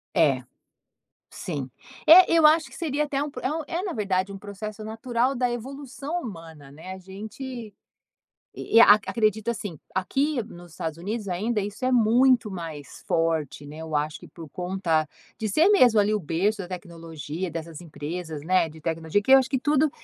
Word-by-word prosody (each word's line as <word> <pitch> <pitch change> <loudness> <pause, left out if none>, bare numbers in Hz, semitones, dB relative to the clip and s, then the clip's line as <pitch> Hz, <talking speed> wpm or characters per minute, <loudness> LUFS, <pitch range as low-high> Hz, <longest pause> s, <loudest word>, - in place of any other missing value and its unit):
É, 135 -5 +3 0.9
sim. 140 -7 -5 0.4
É, 355 +2 +9
eu 325 -2 +5
acho 315 +1 +6
que - - -13
seria 300 -3 -1
até 285 -1 -1
um 295 - -4
é 260 - -1
um 320 0 -2
é 345 +1 -2
na 380 -4 -3
verdade 195 -2 -1
um 195 - -7
processo 210 +1 -7
natural 235 +4 -1
da 250 0 +1
evolução 275 +6 -5
humana, 165 - -10
né, 160 +6 -9
a - - -8
gente 195 +7 -9 1.1
e - - 0
e - - +11
acredito 215 +1 +4
assim, 205 -9 -5
aqui 270 - 0
nos 175 -5 -13
Estados 160 0 -5
Unidos 205 +5 -4
ainda 210 +5 -1
isso 205 +5 -5
é 255 - +2
muito 245 0 +4
mais 160 -7 -8
forte, 160 -3 0
né, 150 +2 -10
eu 160 -1 -5
acho 150 +1 -1
que - - -13
por 165 -3 -11
conta 175 -2 -1 0.3
de 220 - -2
ser 310 - +4
mesmo 250 - +6
ali 205 +1 +2
o - - 0
berço 185 +6 0
da 180 - -7
tecnologia, 165 -1 -6
dessas 165 -1 -6
empresas, 160 -1 -6
né, 180 +2 +2
de 160 0 -13
tecnologia, 165 +4 -1
que 265 - 0
eu 270 - +10
acho 260 -1 +1
que 265 -3 0
tudo 295 +2 +2
200 Hz, 185 wpm, -25 LUFS, 165-250 Hz, 1.1 s, e